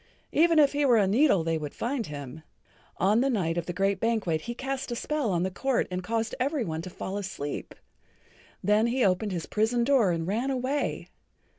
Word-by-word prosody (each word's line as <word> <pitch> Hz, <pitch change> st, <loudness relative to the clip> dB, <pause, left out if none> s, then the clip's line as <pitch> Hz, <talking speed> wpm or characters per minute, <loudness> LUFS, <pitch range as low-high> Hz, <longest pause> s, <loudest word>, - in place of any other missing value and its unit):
Even 330 Hz, +1 st, +4 dB
if 290 Hz, -2 st, +5 dB
he 290 Hz, +1 st, +1 dB
were 250 Hz, -4 st, +5 dB
a 205 Hz, -, +4 dB
needle 205 Hz, -, +3 dB
they 165 Hz, 0 st, 0 dB
would 150 Hz, -2 st, -6 dB
find 240 Hz, -1 st, -2 dB
him. 145 Hz, 0 st, -8 dB, 0.6 s
On 205 Hz, +5 st, +3 dB
the 270 Hz, -, +2 dB
night 180 Hz, -9 st, 0 dB
of 170 Hz, -1 st, -3 dB
the -, -, -2 dB
great 195 Hz, +2 st, 0 dB
banquet 210 Hz, -9 st, 0 dB
he 235 Hz, +6 st, -5 dB
cast 270 Hz, 0 st, -4 dB
a -, -, -1 dB
spell 295 Hz, -1 st, -1 dB
on 175 Hz, -1 st, +1 dB
the 190 Hz, -, -1 dB
court 265 Hz, +6 st, 0 dB
and 180 Hz, 0 st, -3 dB
caused 225 Hz, +3 st, -2 dB
every 275 Hz, -1 st, 0 dB
one 160 Hz, -2 st, -3 dB
to 185 Hz, -, -7 dB
fall 190 Hz, +2 st, -5 dB
asleep. 185 Hz, -7 st, -5 dB, 0.9 s
Then 210 Hz, +2 st, +3 dB
he 245 Hz, 0 st, +1 dB
opened 195 Hz, +2 st, +1 dB
his 175 Hz, -3 st, -3 dB
prison 225 Hz, +3 st, +1 dB
door 250 Hz, -6 st, +4 dB
and 165 Hz, -2 st, -1 dB
ran 225 Hz, +9 st, -1 dB
away. 265 Hz, +2 st, -2 dB
220 Hz, 205 wpm, -27 LUFS, 180-260 Hz, 0.9 s, if